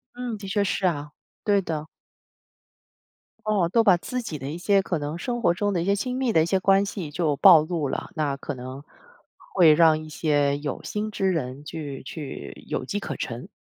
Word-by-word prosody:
嗯， 245 Hz, -3 st, -4 dB
的 200 Hz, -1 st, -8 dB
确 200 Hz, +1 st, +1 dB
是 195 Hz, -1 st, -1 dB
啊。 150 Hz, -4 st, -1 dB, 0.3 s
对 200 Hz, -2 st, +3 dB
的。 155 Hz, -3 st, -4 dB, 1.6 s
哦， 205 Hz, -5 st, +2 dB
都 230 Hz, +2 st, +4 dB
把 195 Hz, -5 st, +6 dB
自 250 Hz, +8 st, -4 dB
己 165 Hz, -10 st, -5 dB
的 135 Hz, +1 st, -6 dB
一 160 Hz, -, -5 dB
些 195 Hz, +2 st, +3 dB
可 180 Hz, -3 st, -2 dB
能 150 Hz, +2 st, -4 dB
生 240 Hz, +7 st, -3 dB
活 170 Hz, -, +4 dB
中 205 Hz, +2 st, -1 dB
的 175 Hz, -, 0 dB
一 170 Hz, -, -2 dB
些 200 Hz, -, +3 dB
亲 250 Hz, +5 st, -3 dB
密 260 Hz, -3 st, +1 dB
的 160 Hz, -, +5 dB
一 -, -, 0 dB
些 190 Hz, +3 st, +1 dB
关 195 Hz, +1 st, +4 dB
系 190 Hz, -6 st, -5 dB
就 150 Hz, -1 st, 0 dB
暴 175 Hz, -6 st, +8 dB
露 155 Hz, -3 st, -2 dB
了， -, -, -4 dB
那 150 Hz, -3 st, 0 dB
可 145 Hz, -, -5 dB
能 130 Hz, +2 st, -8 dB, 0.7 s
会 165 Hz, -5 st, +7 dB
让 160 Hz, -1 st, +5 dB
一 155 Hz, -, -10 dB
些 145 Hz, -2 st, +1 dB
有 145 Hz, -2 st, -5 dB
心 210 Hz, +1 st, -3 dB
之 195 Hz, -2 st, 0 dB
人 140 Hz, -4 st, -3 dB
去 150 Hz, -3 st, -6 dB
去 135 Hz, -, -8 dB
有 -, -, -2 dB
机 205 Hz, +8 st, -2 dB
可 -, -, -5 dB
乘。 120 Hz, 0 st, -5 dB
170 Hz, 225 characters per minute, -25 LUFS, 145-200 Hz, 1.6 s, 暴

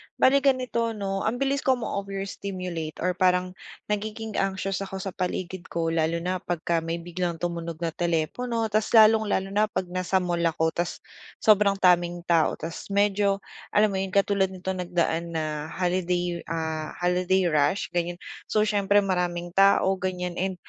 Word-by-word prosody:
Bali 275 Hz, +2 st, +5 dB
ganito 255 Hz, -4 st, +1 dB
'no, 195 Hz, -2 st, -2 dB
ambilis 275 Hz, +4 st, 0 dB
ko 265 Hz, -1 st, +2 dB
ma-overstimulate 195 Hz, -7 st, -5 dB
or 180 Hz, -, +2 dB
parang 180 Hz, 0 st, +2 dB, 0.4 s
nagiging 215 Hz, +1 st, -3 dB
anxious 195 Hz, 0 st, -1 dB
ako 195 Hz, -1 st, -6 dB
sa 190 Hz, 0 st, -4 dB
paligid 180 Hz, 0 st, -4 dB
ko 165 Hz, -1 st, -1 dB
lalo 165 Hz, +1 st, 0 dB
na 185 Hz, +1 st, -1 dB
pagka 170 Hz, -1 st, -1 dB
may 165 Hz, +1 st, -3 dB
biglang 175 Hz, 0 st, -2 dB
tumunog 170 Hz, 0 st, -4 dB
na 165 Hz, -, 0 dB
telepono 175 Hz, +9 st, -1 dB
tapos 215 Hz, +2 st, +1 dB
lalong-lalo 215 Hz, -3 st, +5 dB
na 210 Hz, +2 st, +2 dB
pag 210 Hz, -, -2 dB
nasa 185 Hz, +1 st, 0 dB
mall 175 Hz, -1 st, -1 dB
ako 160 Hz, -1 st, +1 dB
tapos 175 Hz, +2 st, -3 dB, 0.4 s
sobrang 205 Hz, -2 st, +5 dB
daming 175 Hz, -2 st, +2 dB
tao 170 Hz, -2 st, +2 dB
tapos 160 Hz, +1 st, -7 dB
medyo 200 Hz, 0 st, +2 dB, 0.3 s
alam 210 Hz, 0 st, +5 dB
mo 190 Hz, -, -1 dB
yun 190 Hz, 0 st, -3 dB
katulad 200 Hz, -1 st, +3 dB
nitong 185 Hz, -1 st, -4 dB
nagdaan 170 Hz, -1 st, -1 dB
na 155 Hz, -1 st, -2 dB
holiday, 180 Hz, -1 st, -1 dB
ah, 160 Hz, -1 st, -3 dB
holiday 180 Hz, +1 st, +1 dB
rush 150 Hz, +6 st, +1 dB
ganyan. 175 Hz, 0 st, -1 dB, 0.3 s
So, 215 Hz, -, +2 dB
siyempre 205 Hz, -1 st, +3 dB
maraming 175 Hz, -2 st, -1 dB
tao 195 Hz, 0 st, +4 dB
ganyan 180 Hz, -2 st, -3 dB
and 190 Hz, +1 st, -1 dB
185 Hz, 155 wpm, -26 LUFS, 170-200 Hz, 0.4 s, Bali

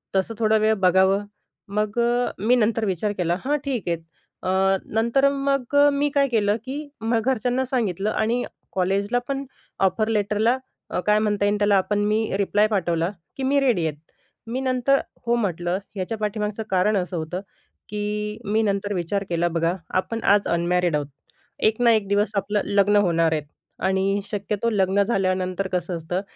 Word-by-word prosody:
तसं 190 Hz, +4 st, 0 dB
थोडा 220 Hz, -1 st, +3 dB
वेळ 215 Hz, 0 st, +3 dB
बघावं. 190 Hz, +2 st, +4 dB, 0.4 s
मग 210 Hz, +2 st, -1 dB
अ, 240 Hz, +1 st, +1 dB
मी 225 Hz, +6 st, +3 dB
नंतर 225 Hz, -1 st, +1 dB
विचार 195 Hz, +1 st, -1 dB
केला 175 Hz, -1 st, +1 dB
हां, 295 Hz, +2 st, +2 dB
ठीक 255 Hz, -9 st, -2 dB
आहे. 170 Hz, -, +1 dB, 0.5 s
अ, 190 Hz, +1 st, +2 dB, 0.2 s
नंतर 235 Hz, +5 st, +3 dB
मग 275 Hz, -1 st, -1 dB
अ, 285 Hz, 0 st, +7 dB
मी 285 Hz, +1 st, +1 dB
काय 280 Hz, -1 st, +4 dB
केलं, 210 Hz, -4 st, +2 dB
की 285 Hz, +3 st, -5 dB
मग 225 Hz, +1 st, +1 dB
घरच्यांना 255 Hz, 0 st, +1 dB
सांगितलं 215 Hz, -6 st, -1 dB
आणि 230 Hz, +3 st, 0 dB, 0.3 s
कॉलेजला 200 Hz, +5 st, +1 dB
पण 275 Hz, 0 st, -2 dB, 0.3 s
ऑफर 205 Hz, +3 st, +2 dB
लेटरला 215 Hz, +2 st, +1 dB, 0.3 s
अ, -, -, -1 dB
काय 210 Hz, 0 st, +5 dB
म्हणता 210 Hz, -1 st, +1 dB
येईल 205 Hz, +1 st, +2 dB
त्याला, 205 Hz, -1 st, +4 dB
आपण 205 Hz, +2 st, 0 dB
मी 215 Hz, +1 st, +1 dB
रिप्लाय 205 Hz, +1 st, +2 dB
पाठवला, 175 Hz, -4 st, 0 dB, 0.3 s
की 270 Hz, -, -3 dB
मी 280 Hz, +2 st, +3 dB
रेडी 245 Hz, -11 st, +2 dB
आहेत. 150 Hz, -2 st, -4 dB, 0.5 s
मी 250 Hz, +3 st, -2 dB
नंतर 260 Hz, +1 st, +2 dB, 0.3 s
"हो", 235 Hz, 0 st, +2 dB
म्हटलं, 180 Hz, -5 st, -1 dB, 0.2 s
याच्या 195 Hz, +4 st, -3 dB
पाठीमागचं 210 Hz, 0 st, -2 dB
कारण 195 Hz, +3 st, +2 dB
असं 180 Hz, -1 st, -2 dB
होतं, 160 Hz, +3 st, -3 dB, 0.5 s
की 210 Hz, 0 st, -3 dB
मी 215 Hz, +2 st, +1 dB
नंतर 205 Hz, 0 st, -1 dB
विचार 190 Hz, +2 st, -1 dB
केला 170 Hz, 0 st, +1 dB
बघा 165 Hz, +1 st, +1 dB, 0.3 s
आपण 190 Hz, +5 st, -4 dB
आज 205 Hz, 0 st, +4 dB
अनमॅरिड 175 Hz, 0 st, +1 dB
आहोत. 145 Hz, -1 st, -1 dB, 0.5 s
एक 220 Hz, +2 st, +1 dB
ना 235 Hz, -1 st, +6 dB
एक 215 Hz, -3 st, +1 dB
दिवस 205 Hz, +2 st, +1 dB
आपलं 200 Hz, +1 st, 0 dB
लग्न 200 Hz, 0 st, +3 dB
होणार 165 Hz, -2 st, +2 dB
आहेत 155 Hz, -2 st, -1 dB, 0.4 s
आणि 195 Hz, +1 st, +1 dB
शक्यतो 205 Hz, +2 st, -2 dB
लग्न 200 Hz, -2 st, +2 dB
झाल्यानंतर 185 Hz, -2 st, 0 dB
कसं 180 Hz, -1 st, -1 dB
असतं, 175 Hz, +3 st, -3 dB
205 Hz, 170 wpm, -23 LUFS, 190-230 Hz, 0.5 s, अ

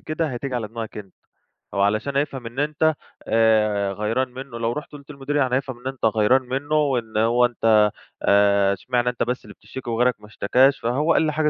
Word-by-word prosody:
كده 155 Hz, +1 st, -2 dB
هتيجي 130 Hz, 0 st, -4 dB
على 115 Hz, -4 st, -3 dB
دماغك 115 Hz, 0 st, -7 dB
أنت، 100 Hz, -3 st, -11 dB, 0.6 s
أو 100 Hz, -, -1 dB
علشان 110 Hz, +8 st, 0 dB
هيفهم 140 Hz, -3 st, -2 dB
إن 115 Hz, +3 st, -9 dB
أنت 150 Hz, +2 st, +1 dB, 0.3 s
آآ 105 Hz, -3 st, +2 dB
غيران 110 Hz, +6 st, -1 dB
منّه، 130 Hz, -1 st, -8 dB
لو 115 Hz, 0 st, -1 dB
رُحت 150 Hz, +3 st, -7 dB
قُلت 145 Hz, 0 st, -12 dB
للمدير 140 Hz, -2 st, -1 dB
هيفهم 130 Hz, -2 st, -4 dB
إن 130 Hz, -, -14 dB
أنت 135 Hz, -2 st, -5 dB
غيران 110 Hz, +4 st, +3 dB
منّه، 135 Hz, +4 st, -3 dB
وإن 125 Hz, -7 st, 0 dB
هو 120 Hz, +2 st, +3 dB
أنت، 110 Hz, -3 st, +3 dB, 0.3 s
آآ 100 Hz, -1 st, +4 dB
أشمعنا 125 Hz, +4 st, -1 dB
أنت 125 Hz, -, -2 dB
بس 125 Hz, +1 st, -3 dB
اللي -, -, -11 dB
بتشتكي 130 Hz, -2 st, -9 dB
وغيرك 120 Hz, +2 st, +2 dB
ما 105 Hz, -, -14 dB
اشتكاش، 130 Hz, +6 st, +2 dB
فهو 140 Hz, +8 st, +1 dB
قال -, -, +3 dB
لي 155 Hz, -1 st, 0 dB
حاجة 150 Hz, 0 st, +1 dB
125 Hz, 200 wpm, -22 LUFS, 110-140 Hz, 0.6 s, آآ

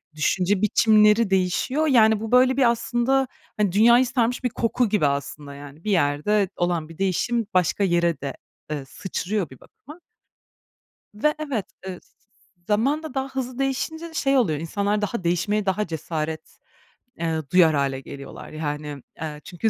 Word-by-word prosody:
düşünce 185 Hz, +5 st, +1 dB
biçimleri 215 Hz, 0 st, +4 dB
değişiyor, 195 Hz, -, +1 dB
yani, 220 Hz, -5 st, +5 dB
bu 220 Hz, 0 st, -5 dB
böyle 255 Hz, +1 st, +5 dB
bir 255 Hz, -3 st, +5 dB
aslında, 245 Hz, +3 st, +1 dB, 0.3 s
hani, 210 Hz, -3 st, +2 dB
dünyayı 235 Hz, +6 st, +5 dB
sarmış 245 Hz, 0 st, 0 dB
bir 250 Hz, -, +1 dB
koku 230 Hz, +1 st, 0 dB
gibi 205 Hz, -7 st, +2 dB
aslında, 140 Hz, +1 st, -4 dB
yani, 145 Hz, +3 st, -12 dB
bir 215 Hz, -, -1 dB
yerde 185 Hz, +5 st, +2 dB
olan 175 Hz, -3 st, -1 dB
bir 165 Hz, -, -12 dB
değişim 200 Hz, +4 st, 0 dB
başka 185 Hz, +2 st, +2 dB
yere 170 Hz, -4 st, +1 dB
de, 140 Hz, -1 st, -4 dB, 0.4 s
eee, 145 Hz, -3 st, -3 dB
sıçrıyor 190 Hz, +4 st, -3 dB
bir 130 Hz, -, -14 dB
bakıma. 300 Hz, +6 st, -15 dB, 1.2 s
Ve 300 Hz, +9 st, +1 dB
evet, 275 Hz, -10 st, -3 dB, 0.2 s
ııı, 185 Hz, -1 st, -6 dB
z -, -, -30 dB
z -, -, -33 dB, 0.5 s
zaman 260 Hz, +9 st, +1 dB
da 315 Hz, -5 st, -8 dB
daha 265 Hz, 0 st, -2 dB
hızlı 260 Hz, -2 st, -5 dB
değişince 275 Hz, +5 st, -2 dB
de 325 Hz, -, -15 dB
şey 275 Hz, -3 st, +2 dB
oluyor, 165 Hz, -, +2 dB
insanlar 200 Hz, +5 st, -1 dB
daha 210 Hz, -2 st, -3 dB
değişmeye 200 Hz, +5 st, 0 dB
daha 200 Hz, +2 st, 0 dB
cesaret, 160 Hz, -1 st, -5 dB, 0.6 s
eee, 165 Hz, -1 st, -1 dB
duyar 170 Hz, -4 st, +5 dB
hâle 135 Hz, -1 st, 0 dB
geliyorlar, 140 Hz, +1 st, -10 dB
yani, 150 Hz, -2 st, -5 dB, 0.2 s
eee, 150 Hz, -2 st, -5 dB
çünkü 190 Hz, +5 st, -1 dB
205 Hz, 160 wpm, -24 LUFS, 160-240 Hz, 1.2 s, yani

